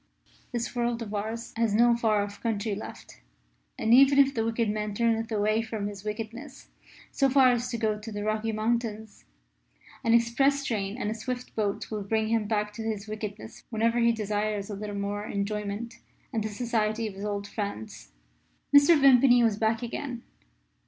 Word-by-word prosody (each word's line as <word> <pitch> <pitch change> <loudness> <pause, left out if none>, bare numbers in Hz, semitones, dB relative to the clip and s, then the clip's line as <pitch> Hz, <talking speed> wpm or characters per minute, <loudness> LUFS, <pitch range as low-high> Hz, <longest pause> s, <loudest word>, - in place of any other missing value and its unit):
This 240 0 -3
world 240 -1 -1
of 210 -1 -8
ours 220 +3 -4
has 225 -3 +1
no 235 +1 +5
far 215 -3 +2
off 205 0 -8
country 220 -2 -1
left, - - -9 0.6
and, 225 +1 +2
even 275 +2 +7
if 275 -1 +5
the 225 - 0
wicked 230 0 0
man 210 0 -2
turneth 225 0 +1
away 215 +1 +1
from 220 -2 -4
his 205 -1 -6
wickedness 225 +6 -7 0.4
so 275 -1 +2
far 260 -1 +6
as 245 0 -1
to 235 - -3
go 215 -2 0
to 220 +1 -8
the 205 -1 -4
Rocky 215 +1 -1
Mountains, 220 -1 -2 0.8
an 230 0 +4
express 270 +4 +2
train 205 -2 -2
and 215 -4 -2
a - - 0
swift 245 +3 -6
boat 205 -1 -2
will 215 -1 -3
bring 220 +2 0
him 225 -2 +1
back 210 -1 -1
to 225 - -7
his 220 -2 -3
wickedness 215 0 -7
whenever 230 +1 +1
he 235 0 +4
desires 210 -1 -2
a - - -4
little 205 0 -5
more 205 +1 -3
enjoyment 210 +3 -3 0.3
and 220 -2 0
the 215 - -2
society 225 0 -1
of 215 - -4
his 195 +1 -8
old 205 -1 -3
friends. 200 - -6 0.6
Mr. 290 +3 +7
Vimpany 255 -3 +6
was 220 -3 +2
back 225 +2 0
again. 240 0 -5
220 Hz, 180 wpm, -27 LUFS, 210-235 Hz, 0.8 s, even